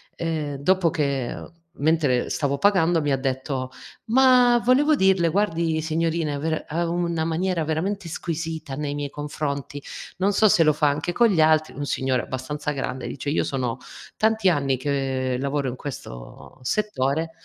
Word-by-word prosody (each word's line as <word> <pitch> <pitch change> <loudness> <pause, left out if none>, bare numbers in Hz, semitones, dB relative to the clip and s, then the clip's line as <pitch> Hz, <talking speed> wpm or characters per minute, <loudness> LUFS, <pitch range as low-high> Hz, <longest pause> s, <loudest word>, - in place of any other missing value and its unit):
ehm, 155 -3 -3
dopo 180 +4 +2
che 140 -6 -1 0.4
mentre 145 -4 +2
stavo 140 -1 0
pagando 175 -2 +3
mi 145 -1 0
ha 135 - +2
detto: 130 0 -3 0.3
"Ma 250 0 +5
volevo 280 +5 +4
dirle, 190 -6 +3
guardi, 165 -4 0
signorina 160 -1 -1
ver 160 +1 -2
ha 170 +2 -1
una 170 -1 -1
maniera 170 +1 0
veramente 170 +5 -2
squisita 160 -3 -4
nei 145 0 -3
miei 145 -1 -3
confronti, 145 -1 -4 0.4
non 195 +3 +1
so 215 +2 +5
se 175 -4 +5
lo 155 -1 +4
fa 150 0 +2
anche 150 +5 -2
con 235 +5 +4
gli 185 -6 +1
altri." 155 0 +3
Un 145 +1 -4
signore 130 -2 0
abbastanza 145 +3 -4
grande 135 -2 -4
dice: 140 +1 -5
"Io 150 - +1
sono 130 -3 -2 0.4
tanti 220 -3 +3
anni 140 -5 +1
che 130 -2 -1
lavoro 140 0 -1
in 125 - -5
questo 125 - -9
settore" 160 -3 0
155 Hz, 160 wpm, -24 LUFS, 140-175 Hz, 0.4 s, Ma